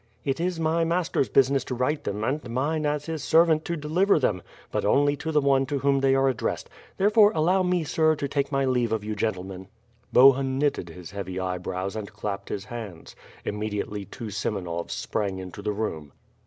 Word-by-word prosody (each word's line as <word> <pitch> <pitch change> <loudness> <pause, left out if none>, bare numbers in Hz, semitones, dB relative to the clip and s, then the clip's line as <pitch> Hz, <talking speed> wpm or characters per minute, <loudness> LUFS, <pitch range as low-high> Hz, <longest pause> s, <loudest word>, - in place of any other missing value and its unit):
"It 135 +1 -1
is 175 0 -1
my 165 +1 +1
master's 165 -5 0
business 135 0 +3
to 125 - -3
write 130 +5 -1
them; 105 +2 -3
and 135 +1 -2
mine, 150 +6 0
as 150 0 -1
his 160 -3 -4
servant, 160 -1 +4
to 170 - -2
deliver 165 +7 +2
them. 105 - 0 0.3
But - - -1
only 145 +1 +3
to 160 - -4
the 150 -1 +3
one 135 -1 +3
to 145 - -1
whom 140 0 +2
they 135 0 +3
are 135 0 +3
addressed; 130 -4 -2 0.3
therefore, 210 +1 +5
allow 175 +5 +3
me, 180 -2 +1
sir, 155 +1 +2
to 145 -1 -3
take 140 0 -1
my 135 -1 +1
leave 125 -3 +1
of 110 -2 -1
you 105 0 -3
gentlemen." 95 -3 -3 0.4
Bohun 135 +1 +5
knitted 140 -11 0
his 85 0 -10
heavy 95 -2 -5
eyebrows 95 +1 -3
and 105 -3 -5
clapped 100 -1 -5
his 100 0 -4
hands. 110 -8 -8 0.3
Immediately 105 -1 -3
two 110 +1 -8
Semenovs 95 -4 -3
sprang 100 -3 -2
into 95 +1 -8
the 105 - -2
room. 80 -9 -4
130 Hz, 195 wpm, -26 LUFS, 100-150 Hz, 0.4 s, therefore